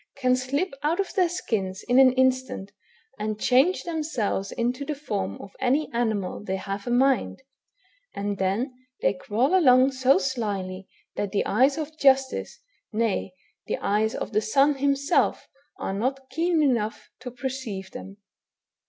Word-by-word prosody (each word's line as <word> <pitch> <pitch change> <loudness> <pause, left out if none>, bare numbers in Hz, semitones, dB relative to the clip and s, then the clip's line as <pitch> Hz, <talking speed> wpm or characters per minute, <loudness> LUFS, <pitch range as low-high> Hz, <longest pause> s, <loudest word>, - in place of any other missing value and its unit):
can 255 -2 +3
slip 275 +7 -1
out 315 +5 0
of 395 - -1
their 370 -4 +2
skins 200 - -3
in 250 +1 +4
an 265 -1 +7
instant 260 -6 0 0.5
and 215 0 -3
change 270 +12 +3
themselves 300 - -2
into 245 +3 -1
the 295 +1 -3
form 100 - -4
of 200 - -11
any 275 +4 +1
animal 220 -5 -1
they 190 -2 -2
have 195 +3 -5
a - - -1
mind; 265 +1 +2 0.7
and 200 0 -3
then 205 +8 0 0.3
they - - +3
crawl 220 - 0
along 260 -6 +6
so 260 0 +3
slyly, 200 -7 -3 0.3
that 205 -2 -2
the 200 - 0
eyes 260 +7 +3
of 310 0 -5
justice, 270 -1 +2 0.3
nay, 220 -3 -1 0.4
the - - -1
eyes 215 +2 0
of - - -4
the 215 - +3
sun 275 +7 +3
himself, 280 0 +1 0.3
are - - -3
not 260 +6 -2
keen 330 +2 +1
enough 230 -6 -1
to 250 +1 -7
perceive 245 -6 -5
them. 195 +1 -9
255 Hz, 155 wpm, -25 LUFS, 205-275 Hz, 0.7 s, an